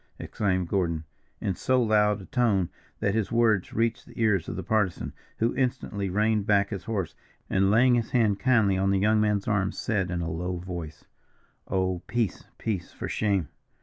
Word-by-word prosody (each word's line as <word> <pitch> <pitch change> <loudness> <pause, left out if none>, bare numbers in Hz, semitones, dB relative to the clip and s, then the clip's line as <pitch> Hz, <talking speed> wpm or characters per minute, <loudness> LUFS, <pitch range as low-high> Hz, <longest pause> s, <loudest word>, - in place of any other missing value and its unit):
exclaimed 95 -3 -1
Gordon, 85 -4 0 0.4
in 95 - -1
so 130 +7 +1
loud 105 -3 +3
a - - -10
tone 110 - +1 0.3
that 100 - +1
his 110 -1 -1
words 115 -5 +2
reached 115 0 -1
the - - -12
ears 105 -6 +2
of - - -4
the - - -4
Partisan, 105 -2 0 0.2
who 115 +2 +1
instantly 125 -6 -1
reined 105 +1 +1
back 100 0 +3
his 100 - -5
horse, 100 -7 -2 0.4
and 95 0 +3
laying 120 +4 +5
his 120 -2 +1
hand 110 -5 +2
kindly 110 -7 +3
on 95 0 +2
the 100 - +3
young 105 +2 +3
man's 105 -2 +1
arm, 100 -3 +1
said, 100 -6 -1
in 90 -1 -2
a 85 - -2
low 90 +3 -3
voice: 85 -4 -7 0.6
"Oh, 95 -2 0
peace, 115 -5 -1
peace, 100 -6 -3
for - - -6
shame! 100 -8 0
100 Hz, 180 wpm, -27 LUFS, 95-110 Hz, 0.6 s, laying